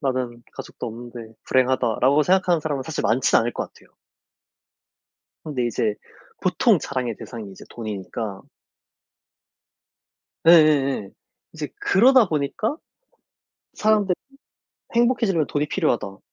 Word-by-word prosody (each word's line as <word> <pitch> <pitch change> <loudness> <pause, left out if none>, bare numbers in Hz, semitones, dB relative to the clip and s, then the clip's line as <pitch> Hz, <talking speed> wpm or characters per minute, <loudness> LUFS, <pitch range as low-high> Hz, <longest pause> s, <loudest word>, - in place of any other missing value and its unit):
나는 125 -3 -2
가족도 - - -8
없는데 115 -1 -9
불행하다.'라고 130 +2 +2
생각하는 180 -1 +2
사람은 145 -3 -2
사실 155 +3 -4
많진 110 +5 +3
않을 120 +1 -1
것 - - -5
같아요. - - -23 1.5
근데 130 -6 -2
이제 110 -2 -1 0.5
보통 - - +3
자랑의 125 -5 -3
대상이 110 -5 -8
이제 95 - -13
돈이니까 105 -2 -6 2.0
예예예. 145 - +5 0.4
이제 - - -5
그러다 240 +1 +5
보니까 155 - -1 1.0
사람들이 210 -3 +2 0.8
'행복해지려면 230 - +2
돈이 145 +2 -2
필요하다.' 110 - -1
135 Hz, 280 characters per minute, -23 LUFS, 115-170 Hz, 2.0 s, 예예예